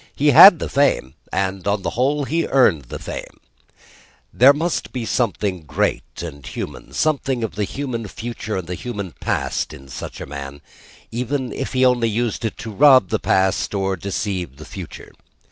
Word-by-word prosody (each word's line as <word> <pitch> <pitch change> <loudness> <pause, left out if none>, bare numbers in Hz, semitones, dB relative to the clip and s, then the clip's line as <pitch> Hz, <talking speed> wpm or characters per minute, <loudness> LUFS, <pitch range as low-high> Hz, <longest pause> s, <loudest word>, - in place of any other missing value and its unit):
He 145 +1 +3
had 175 +7 +10
the - - -4
fame; 140 - +1 0.2
and, 95 0 -2
on 100 -1 0
the - - -2
whole, 140 +4 +1
he 165 +5 -1
earned 105 - +3
the - - -7
fame. - - -8 0.9
There 130 +3 +7
must 160 +3 -1
have - - -31
been 125 -3 -3
something 105 -6 -1
great 75 - -2
and 70 -5 -8
human, - - -7
something 135 -5 0
of 110 - -3
the 105 0 -1
human 120 -3 -4
future 115 0 -5
and 95 - -4
the 90 - -4
human 100 -2 -5
past, - - -2
in 65 0 -13
such 65 - -7
a - - -6
man: 70 0 -8 0.5
even 125 +2 -2
if 135 - -4
he 130 0 +3
only 120 -2 +3
used 115 +1 -2
it 110 - -3
to 115 - -7
rob 130 -3 +6
the - - 0
past 95 +2 +1
or 95 -1 0
deceive 95 -5 -4
the 75 - -10
future. - - -9
110 Hz, 180 wpm, -21 LUFS, 95-130 Hz, 0.9 s, had